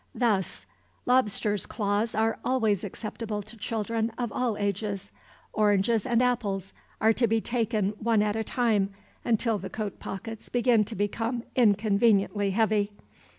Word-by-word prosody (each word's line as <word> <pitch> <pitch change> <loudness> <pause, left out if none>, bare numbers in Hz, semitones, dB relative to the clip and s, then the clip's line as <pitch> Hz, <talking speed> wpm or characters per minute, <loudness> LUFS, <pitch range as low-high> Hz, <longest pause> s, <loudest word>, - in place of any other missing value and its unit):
Thus: 210 -7 0 0.4
Lobsters' 210 -4 +2
claws 205 +1 -1
are 225 +1 +1
always 220 -7 +1
acceptable 210 +1 -5
to 215 +3 -12
children 225 +1 -2
of 240 -3 -2
all 235 -3 -1
ages. 200 -1 -2 0.4
Oranges 210 +1 +2
and 240 0 +3
apples 200 -6 -1 0.3
are 220 +1 +4
to 235 +1 +2
be 225 +1 +2
taken 225 -4 0
one 225 -2 +2
at 210 0 0
a 220 - -1
time, 220 -5 +1 0.3
until 225 -2 +1
the 190 - -6
coat 210 -3 -5
pockets 220 +3 -7
begin 240 -3 +3
to 220 - -6
become 225 +4 -1
inconveniently 205 -2 +3
heavy. 210 0 +1
215 Hz, 140 wpm, -27 LUFS, 205-230 Hz, 0.4 s, are